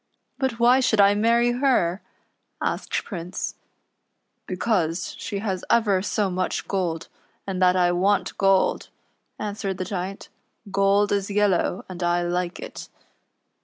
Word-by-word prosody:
" - - -47
Rut 260 -3 -1
why 245 +2 +5
should 235 -4 +2
I 200 0 +7
marry 235 +3 +3
her 240 -8 +1 0.3
?" - - -50
asked - - -2
Prince, 180 -2 -5 0.5
" - - -51
Because 185 - -1
she 205 -5 -4
has 195 -3 -3
ever 205 -5 +3
so 205 0 0
much 185 0 -2
gold, 170 -4 -2 0.4
and 190 -2 -3
that 180 0 +5
I 175 -1 +3
want 185 +1 +1
gold," 195 -1 +2 0.5
answered 205 -2 -3
the 185 - -3
Giant. 190 +1 -5 0.2
" - - -49
Gold 200 +1 +3
is 200 0 0
yellow, 200 -2 +1
and 185 -1 -8
I 175 0 +1
like 175 0 -2
it.'' - - -8
195 Hz, 150 wpm, -24 LUFS, 180-210 Hz, 0.5 s, I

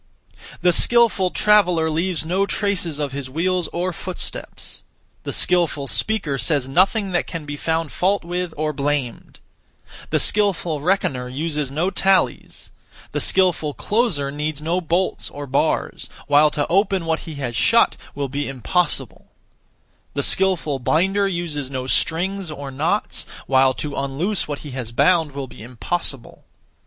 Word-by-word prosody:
The 180 -1 +5
skilful 230 -3 +4
traveller 180 -6 +3
leaves 165 +1 -1
no 190 +4 +1
traces 190 -8 -1
of 145 -2 -2
his 135 -1 -5
wheels 175 +3 0
or 180 +1 -2
footsteps; 185 +2 -5 0.4
the - - -2
skilful 170 -6 +2
speaker 150 -5 -1
says 145 -4 0
nothing 195 - +2
that 175 - 0
can 165 -3 -6
be 145 0 -5
found 160 +1 -1
fault 195 +2 +1
with 175 0 -3
or 155 0 -1
blamed; 140 -4 -3 0.7
the - - +2
skilful 185 -7 +2
reckoner 145 -8 0
uses 150 +1 -2
no 160 +7 -1
tallies; 190 0 0 0.4
the - - -1
skilful 175 -6 +3
closer 200 - 0
needs 150 0 -3
no 170 +4 -1
bolts 175 +3 -1
or 145 0 -7
bars, 135 0 -1 0.2
while 145 +1 +5
to 145 -1 -1
open 190 -1 +1
what 160 0 0
he 155 - -7
has 125 -4 -4
shut 105 - +4 0.2
will 140 -1 -2
be 140 +2 -3
impossible; 150 +6 -1 0.9
the 140 - 0
skilful 175 -7 +2
binder 190 +9 +2
uses 165 -7 -3
no 130 -2 -4
strings 175 +6 0
or 140 -2 -7
knots, 160 +10 -1 0.2
while 130 -1 +3
to 145 -2 -4
unloose 150 +9 -1
what 145 -1 -4
he 145 - -7
has 125 -3 -5
bound 160 +3 +3
will 140 -1 -4
be 125 - -13
impossible. 125 +3 -4
160 Hz, 145 wpm, -21 LUFS, 140-185 Hz, 0.9 s, The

